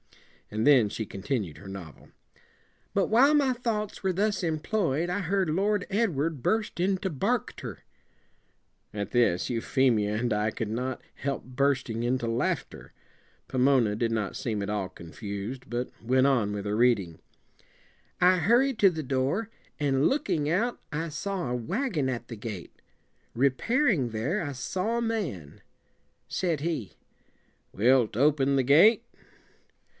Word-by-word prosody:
And 110 Hz, +2 st, -2 dB
then 130 Hz, -8 st, +6 dB
she 110 Hz, -, -4 dB
continued 100 Hz, -, -4 dB
her 95 Hz, -, -12 dB
novel. 95 Hz, -6 st, -10 dB, 0.8 s
"'But 200 Hz, -, +2 dB
while 265 Hz, +7 st, +5 dB
my 275 Hz, -3 st, +3 dB
thoughts 225 Hz, -4 st, -3 dB
were 190 Hz, -, +2 dB
thus 200 Hz, +1 st, 0 dB
employ 160 Hz, -1 st, 0 dB
ed, 175 Hz, -, -3 dB
I 180 Hz, +3 st, -1 dB
heard 190 Hz, -1 st, 0 dB
Lord 200 Hz, +4 st, +1 dB
Edward 165 Hz, -, 0 dB
burst 220 Hz, -5 st, 0 dB
into 190 Hz, +1 st, 0 dB
bark 200 Hz, -, -1 dB
ter -, -, -8 dB, 0.6 s
'" -, -, -44 dB
At 100 Hz, -2 st, -3 dB
this 115 Hz, -8 st, +2 dB
Euphemia 115 Hz, -3 st, +1 dB
and 120 Hz, 0 st, 0 dB
I 105 Hz, +1 st, 0 dB
could 110 Hz, -1 st, -4 dB
not 125 Hz, +3 st, -3 dB
help 140 Hz, 0 st, -3 dB
bursting 130 Hz, -3 st, 0 dB
into 120 Hz, 0 st, 0 dB
laughter. 115 Hz, +2 st, -2 dB, 0.6 s
Pomona 130 Hz, -5 st, +3 dB
did 115 Hz, +1 st, 0 dB
not 110 Hz, -3 st, -2 dB
seem 110 Hz, -4 st, -2 dB
at 100 Hz, -, -3 dB
all 100 Hz, -3 st, -2 dB
confused, 100 Hz, +7 st, -7 dB
but 120 Hz, +1 st, -2 dB
went 130 Hz, +3 st, +3 dB
on 120 Hz, -7 st, +2 dB
with 105 Hz, -1 st, -4 dB
her 105 Hz, 0 st, -1 dB
reading. 105 Hz, -8 st, +2 dB, 1.0 s
"'I 180 Hz, +1 st, +5 dB
hurried 240 Hz, -, +3 dB
to 195 Hz, -, +7 dB
the 160 Hz, -3 st, -4 dB
door, 135 Hz, -, -1 dB, 0.3 s
and, 140 Hz, -1 st, +2 dB
look 295 Hz, +2 st, -1 dB
ing 150 Hz, -2 st, +1 dB
out, 225 Hz, +9 st, 0 dB
I 160 Hz, +2 st, -2 dB
saw 180 Hz, -1 st, -3 dB
a 125 Hz, -, -1 dB
wagon 170 Hz, -, -1 dB
at 120 Hz, -2 st, -4 dB
the 115 Hz, -, -7 dB
gate. 105 Hz, -5 st, -7 dB, 0.6 s
Re 135 Hz, +3 st, +4 dB
pair 255 Hz, -, +1 dB
ing 140 Hz, -, +2 dB
there, 120 Hz, -, -1 dB
I 145 Hz, -, -3 dB
saw 185 Hz, -, -2 dB
a -, -, 0 dB
man. 175 Hz, -, -3 dB, 0.7 s
Said 170 Hz, -5 st, -1 dB
he 155 Hz, -, -3 dB, 0.8 s
"Wilt 120 Hz, 0 st, +3 dB
open 140 Hz, 0 st, +3 dB
the 135 Hz, -, +3 dB
gate?" 195 Hz, -, +6 dB
135 Hz, 155 wpm, -28 LUFS, 115-190 Hz, 1.0 s, to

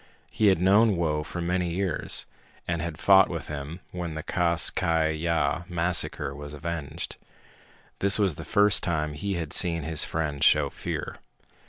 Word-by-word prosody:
He 110 Hz, -, +2 dB
had 95 Hz, -4 st, +4 dB
known 100 Hz, +4 st, +4 dB
Whoa 80 Hz, -3 st, 0 dB
for 85 Hz, +3 st, -6 dB
many 90 Hz, +1 st, -1 dB
years, 95 Hz, -4 st, -2 dB, 0.4 s
and 85 Hz, -1 st, -1 dB
had 85 Hz, -2 st, -5 dB
fought 95 Hz, 0 st, +5 dB
with 85 Hz, -3 st, -6 dB
him 75 Hz, +4 st, -6 dB
when 85 Hz, -3 st, -5 dB
the 80 Hz, -, -5 dB
Kas 85 Hz, -1 st, +2 dB
Kai 80 Hz, -3 st, +1 dB
Ya 80 Hz, -1 st, 0 dB
massacre 85 Hz, -5 st, 0 dB
was 75 Hz, +1 st, -9 dB
avenged. 80 Hz, 0 st, -5 dB, 0.8 s
This 100 Hz, 0 st, +4 dB
was 100 Hz, -5 st, +2 dB
the -, -, -8 dB
first 105 Hz, 0 st, +3 dB
time 75 Hz, -5 st, -2 dB
he 100 Hz, +6 st, -3 dB
had 80 Hz, -3 st, -4 dB
seen 85 Hz, -3 st, +2 dB
his 80 Hz, 0 st, +2 dB
friend 75 Hz, -3 st, -3 dB
show 75 Hz, -2 st, +4 dB
fear. -, -, -5 dB
85 Hz, 165 wpm, -26 LUFS, 75-90 Hz, 0.8 s, fought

